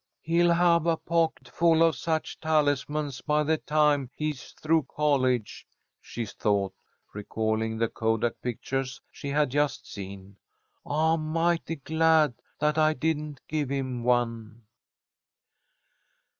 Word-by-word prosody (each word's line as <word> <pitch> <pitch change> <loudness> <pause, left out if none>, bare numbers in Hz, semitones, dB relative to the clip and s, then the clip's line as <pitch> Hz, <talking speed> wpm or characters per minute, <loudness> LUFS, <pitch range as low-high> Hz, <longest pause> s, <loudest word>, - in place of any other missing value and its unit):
"He'll 170 +2 +3
have 170 -1 +3
a 165 -1 +2
pocket 165 0 0
full 165 -1 +3
of 165 -2 +3
such 160 +4 -2
talismans 145 -2 0
by 150 0 +1
the 155 +1 +1
time 150 -3 +2
he's 150 -3 -4
through 155 -2 +1
college," 130 -6 0 0.3
she 120 - -5
thought, 100 -1 -1 0.4
recalling 110 +1 -2
the 115 +1 +1
kodak 115 +1 -1
pictures 130 +3 -3
she 140 - -7
had 145 -1 +1
just 145 +1 0
seen. 100 0 -9 0.5
"I'm 155 +1 +1
mighty 165 0 0
glad 160 -1 +3 0.2
that 150 +1 +1
I 155 0 +4
didn't 150 0 -2
give 150 -3 -2
him 130 -3 -3
one." 115 -2 -1
145 Hz, 120 wpm, -27 LUFS, 120-160 Hz, 0.5 s, I